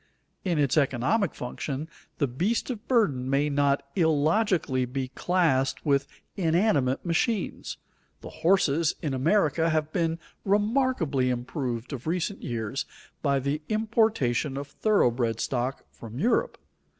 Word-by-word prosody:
In 175 -4 0
its 145 0 +2
economic 145 - +1
function 135 +4 -4 0.3
the 145 - +2
beast 180 - -1
of 225 -3 -7
burden 145 - +2
may 145 +2 +2
not 140 0 +2
illogically 160 - +2
be 130 +1 -4
classed 135 -5 +1
with 140 -1 +2 0.3
inanimate 165 -7 +1
machines. 185 +5 -1 0.4
The - - -9
horses 165 -3 +3
in 145 -4 -1
America 160 +3 +2
have 155 -1 0
been 165 -1 0 0.3
remarkably 205 - +1
improved 125 0 -3
of 135 +2 -6
recent 180 +4 -1
years 120 +5 -3 0.4
by 140 -2 +2
the 140 +3 -1
importation 215 - +1
of 140 0 -5
thoroughbred 120 - +1
stock 130 +1 -2
from 115 0 -10
Europe. 250 - +1
150 Hz, 125 wpm, -27 LUFS, 130-185 Hz, 0.4 s, horses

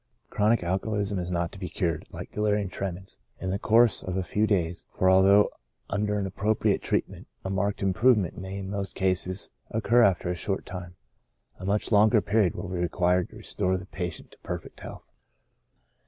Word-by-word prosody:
Chronic 105 0 +2
alcoholism 100 +2 -1
is 90 0 -4
not 85 -1 -1
to 100 - -11
be 90 -3 -4
cured, 80 -1 -2
like - - -8
delirium 105 -2 0
tre 95 +1 -3
mens, 95 -2 -10 0.2
in 95 - -3
the 100 - -1
course 115 +1 +4
of 90 0 -4
a 95 - 0
few 105 +4 0
days; 90 -5 -1
for 95 0 +2
although 100 +2 +5 0.4
under 105 +1 0
an 100 - -1
appropriate 105 +3 0
treatment - - -2 0.2
a 95 - -2
marked 100 +1 -1
improvement 100 -1 +3
may 95 +1 -6
in 95 -1 -5
most 100 -1 -3
cases 95 0 -1 0.2
occur 115 +2 +3
after 95 -5 +3
a - - -2
short 95 +3 -3
time, 90 -1 -8 0.6
a - - -7
much 105 +3 0
longer 110 +1 +5
period 105 -3 +1
will 100 - -5
be 90 -1 -4
required 90 +1 +1
to - - -15
restore 95 0 -1
the 95 - -8
patient 90 -3 -6
to - - -19
perfect - - -7
health. - - -10
95 Hz, 185 wpm, -27 LUFS, 90-105 Hz, 0.6 s, although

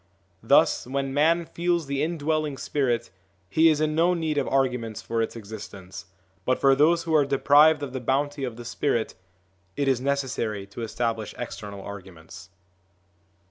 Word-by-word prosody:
Thus, - - +3
when 135 +1 -2
man 165 +4 +3
feels 170 0 -1
the 140 0 -2
indwelling 155 -3 -1
spirit, 120 -8 -1 0.4
he 160 - +4
is 155 -2 +2
in 155 0 +1
no 170 +3 +3
need 160 -3 -1
of - - -2
arguments 125 -5 0
for 115 0 -1
its 115 - -3
existence; 100 -3 -9 0.4
but 130 - +1
for 135 -1 +4
those 165 +5 +3
who 165 -1 -2
are 150 -2 +5
deprived 145 +2 +4
of 135 -3 -5
the 130 - -3
bounty 140 +3 -1
of 125 -3 -3
the 120 0 -10
spirit, 120 -2 -1 0.6
it 140 - -1
is 130 -2 +2
necessary 130 -7 -2
to 100 +4 -9
establish 115 -1 -3
external 105 -4 -7
arguments. 95 -2 -11
135 Hz, 160 wpm, -25 LUFS, 115-150 Hz, 0.6 s, are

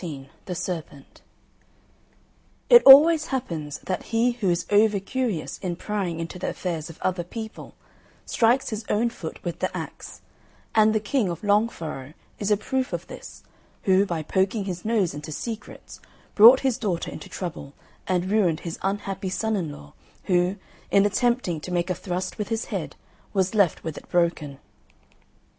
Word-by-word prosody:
XIV 140 -6 -7 0.2
THE 180 - -4
SERPENT 160 -6 -6 1.5
It 480 -1 +10
always 305 +3 +9
happens 165 - -4
that 185 - -3
he 230 +2 +2
who 235 -6 -1
is 175 0 0
over 205 0 +4
curious 215 - -3
in 180 -3 -3
prying 185 -3 -3
into 165 +2 -6
the - - -2
affairs 170 -3 -4
of 165 - -11
other 185 -1 0
people, 220 +5 -8 0.5
strikes 240 +3 +2
his 215 0 -4
own 230 +3 +1
foot 160 -8 -7
with 175 -2 -4
the - - 0
axe; - - -8 0.5
and 215 0 +4
the - - +3
King 215 0 0
of 170 +1 -6
Long 210 +2 +3
Furrow 155 - -7 0.3
is 205 - -1
a 210 - +4
proof 260 +1 -2
of 175 0 -3
this, - - -11 0.4
who, 190 0 +4
by 165 -3 -3
poking 190 +6 0
his 180 -2 -5
nose 215 -7 +1
into 150 +2 -7
secrets, 220 +7 -7 0.3
brought 235 +5 +8
his 260 -2 0
daughter 185 -8 -2
into - - -9
trouble 155 -6 -6 0.3
and 185 +1 0
ruined 185 -7 +2
his 165 -1 -6
unhappy 195 -1 -3
son 220 +3 -1
in 170 -7 -2
law 75 - -12 0.3
who, 180 +1 +1 0.3
in 200 0 +4
attempting 205 -4 +1
to 180 - -7
make 175 +1 0
a - - +2
thrust 180 +2 -4
with 210 - -2
his 225 0 -2
head - - -4 0.4
was 190 -1 +1
left 200 -6 +2
with 160 -3 -5
it - - -23
broken. 170 -5 0
190 Hz, 170 wpm, -25 LUFS, 170-220 Hz, 1.5 s, It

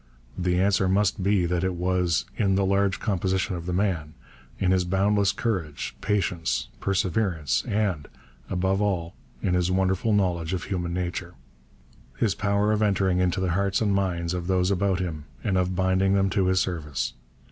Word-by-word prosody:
The 90 -1 0
answer 95 0 +2
must 100 +1 +2
be 95 -1 +2
that 90 +1 0
it 95 -1 0
was 90 -4 +1
'in 95 -3 +2
the 100 0 +2
large 100 0 +1
composition 95 -1 0
of 85 0 -6
the - - -1
man'; 90 -5 -1 0.4
in 95 - +1
his 95 -1 +3
boundless 100 +2 +2
courage, 95 -9 -3
patience, 85 - -1
perseverance; 90 - 0
and, 100 -8 -1 0.4
above 95 +2 0
all, 90 -5 -1 0.3
in 90 - +1
his 90 0 +1
wonderful 95 +3 +1
knowledge 90 -4 +1
of 90 - -2
human 90 -3 -3
nature 90 -1 -4 0.8
his 100 - +1
power 100 +2 +1
of 110 0 +1
entering 95 -3 +2
into 90 0 +1
the 95 -2 0
hearts 100 +2 +1
and 105 -3 +1
minds 90 -3 0
of 90 -1 -3
those 95 0 +2
about 95 -1 +1
him 80 -5 -4 0.2
and 95 - 0
of 90 0 +1
binding 95 +1 +2
them 95 -1 +2
to 95 -1 +2
his 95 0 +3
service. 75 -9 -2
95 Hz, 170 wpm, -25 LUFS, 90-100 Hz, 0.8 s, his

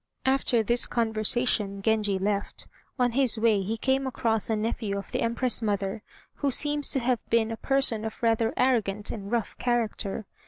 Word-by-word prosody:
After 265 -3 +2
this 240 +3 +1
conversation 220 -2 0
Genji 215 -3 +1
left. 200 +1 -2 0.3
On 250 -2 +2
his 250 -2 +2
way 220 -2 +3
he 215 +4 -3
came 265 +3 0
across 225 -4 0
a 220 - +2
nephew 215 -2 -2
of 200 - -7
the - - -1
Empress 235 +1 +1
mother, 205 -1 -1 0.4
who 285 - 0
seems 295 +2 +2
to 275 - +3
have 245 -1 +1
been 230 -1 +2
a 225 - -4
person 270 -5 +1
of 220 +1 -6
rather 225 0 +2
arrogant 215 -5 +1
and 200 -2 -7
rough 235 -4 -1
character. 225 -4 -1
225 Hz, 170 wpm, -27 LUFS, 210-245 Hz, 0.4 s, way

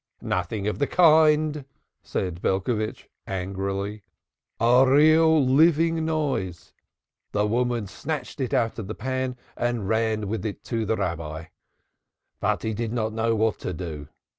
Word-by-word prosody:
"Nothing 95 +3 -2
of 105 - -2
the 140 - +1
kind," 155 -3 +4 0.4
said 90 -2 -4
Belcovitch 110 +3 -1 0.2
angrily, 100 +2 -3 0.6
"A 125 +3 +5
real 155 +1 +5
living 160 +4 +3
noise. 140 - -2 0.6
The 105 0 +2
woman 120 0 0
snatched 135 - -5
it 130 - -2
out 115 0 0
of 105 - -5
the 110 - -5
pan 130 +1 -3 0.2
and 120 -4 -1
ran 110 -1 0
with 105 -1 -3
it 110 -3 -5
to 115 -2 -2
the 110 - +1
Rabbi. 80 -1 -4 0.9
But - - 0
he 110 - -1
did 115 +1 -3
not 110 -2 -1
know 115 +1 +1
what 110 0 +1
to 90 - -4
do. 80 -4 -6
115 Hz, 140 wpm, -25 LUFS, 100-135 Hz, 0.9 s, A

